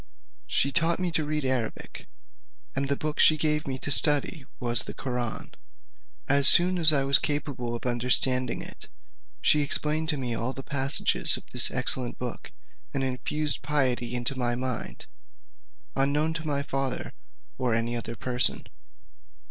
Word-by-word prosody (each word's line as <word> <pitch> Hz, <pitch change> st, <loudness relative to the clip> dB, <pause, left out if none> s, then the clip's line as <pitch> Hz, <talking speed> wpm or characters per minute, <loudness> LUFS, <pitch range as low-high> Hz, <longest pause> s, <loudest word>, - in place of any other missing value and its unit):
She 140 Hz, -, +1 dB
taught 165 Hz, +3 st, +1 dB
me 180 Hz, -1 st, -2 dB
to 160 Hz, -1 st, -2 dB
read 150 Hz, -1 st, -3 dB
Arabic, 130 Hz, -4 st, -5 dB, 0.7 s
and 135 Hz, 0 st, -2 dB
the 140 Hz, -, 0 dB
book 150 Hz, +1 st, -5 dB
she 155 Hz, -, +5 dB
gave 150 Hz, -1 st, -1 dB
me 130 Hz, -1 st, -4 dB
to 145 Hz, -, -5 dB
study 145 Hz, 0 st, +1 dB
was 120 Hz, -2 st, +3 dB
the -, -, -7 dB
Koraun. 125 Hz, -4 st, -5 dB, 0.7 s
As 140 Hz, 0 st, +6 dB
soon 180 Hz, +3 st, +7 dB
as 160 Hz, -2 st, +7 dB
I 140 Hz, -3 st, +2 dB
was 135 Hz, 0 st, +5 dB
capable 135 Hz, -5 st, -3 dB
of 120 Hz, -, -9 dB
understanding 125 Hz, +1 st, +2 dB
it, -, -, -11 dB, 0.5 s
she 150 Hz, -, +3 dB
explained 155 Hz, +2 st, -2 dB
to 150 Hz, -, +1 dB
me 125 Hz, -3 st, -4 dB
all 115 Hz, +3 st, -3 dB
the 135 Hz, -, -9 dB
passages 140 Hz, +1 st, +3 dB
of -, -, -13 dB
this -, -, +6 dB
excellent 125 Hz, -2 st, -2 dB
book, 125 Hz, -1 st, -7 dB, 0.4 s
and 135 Hz, -, -1 dB
infused 140 Hz, +3 st, -3 dB
piety 130 Hz, -4 st, -1 dB
into 120 Hz, +2 st, 0 dB
my 120 Hz, -2 st, -2 dB
mind, 125 Hz, -, -5 dB, 0.9 s
unknown 145 Hz, +4 st, 0 dB
to 160 Hz, -1 st, -6 dB
my 140 Hz, -1 st, -2 dB
father 135 Hz, -2 st, -4 dB, 0.5 s
or 125 Hz, -3 st, -1 dB
any 115 Hz, +1 st, -2 dB
other 115 Hz, 0 st, -6 dB
person. 125 Hz, +1 st, +1 dB
135 Hz, 155 wpm, -25 LUFS, 125-150 Hz, 0.9 s, soon